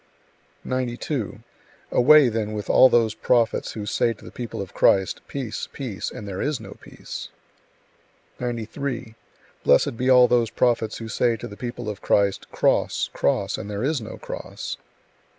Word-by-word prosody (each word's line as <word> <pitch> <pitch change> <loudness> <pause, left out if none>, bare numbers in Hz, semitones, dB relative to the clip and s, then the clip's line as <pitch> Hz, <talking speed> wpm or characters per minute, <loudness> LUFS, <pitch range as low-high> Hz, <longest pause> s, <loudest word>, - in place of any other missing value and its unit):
92. 125 0 -3 0.5
Away, 150 +2 +7
then, 110 -2 -2
with 105 -1 -2
all 130 - +8
those 115 -3 +3
prophets 115 +1 +1
who 105 -2 -5
say 115 +3 +1
to 105 - -17
the - - -10
people 120 -2 -6
of 100 -2 -6
Christ, 95 -1 +3
"Peace, 130 -6 -5
peace," 120 -8 -4
and 105 - -8
there 95 -1 -4
is 145 -2 -1
no - - -10
peace! - - -8 1.1
93. 120 0 -4 0.5
Blessed 115 - +3
be 125 +2 0
all 125 -1 +7
those 120 -2 +2
prophets 115 -2 +1
who 115 - -7
say 115 +2 +1
to - - -7
the 105 - -10
people 120 0 -6
of 105 -2 -5
Christ, 100 -1 +1
"Cross, - - +1
cross," - - 0
and 100 - -6
there 105 +2 -3
is 145 -1 0
no 110 - -8
cross! - - -6
115 Hz, 160 wpm, -24 LUFS, 105-125 Hz, 1.1 s, all